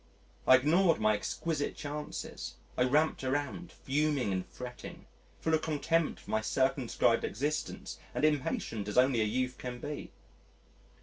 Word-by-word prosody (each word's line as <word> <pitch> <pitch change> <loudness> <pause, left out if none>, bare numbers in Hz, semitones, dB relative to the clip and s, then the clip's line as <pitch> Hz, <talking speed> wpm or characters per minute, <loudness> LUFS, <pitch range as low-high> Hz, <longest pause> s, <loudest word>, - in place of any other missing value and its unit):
I 130 - +10
ignored 165 +6 +4
my 110 0 +4
exquisite 145 +8 -2
chances, 150 0 -5 0.2
I 125 - +3
ramped 150 +3 +2
around, 145 +6 -2
fuming 140 -6 0
and 95 0 -1
fretting, 125 -1 -9 0.4
full 160 - 0
of 160 - +3
contempt 160 +1 0
for - - -9
my 110 - +2
circumscribed 130 +2 +2
existence, 145 +7 -3 0.2
and - - +2
impatient 130 -7 0
as 105 - -3
only 125 -2 +5
a - - +3
youth 125 +3 -1
can 125 -1 -5
be. 145 +3 -5
135 Hz, 140 wpm, -32 LUFS, 125-150 Hz, 0.4 s, I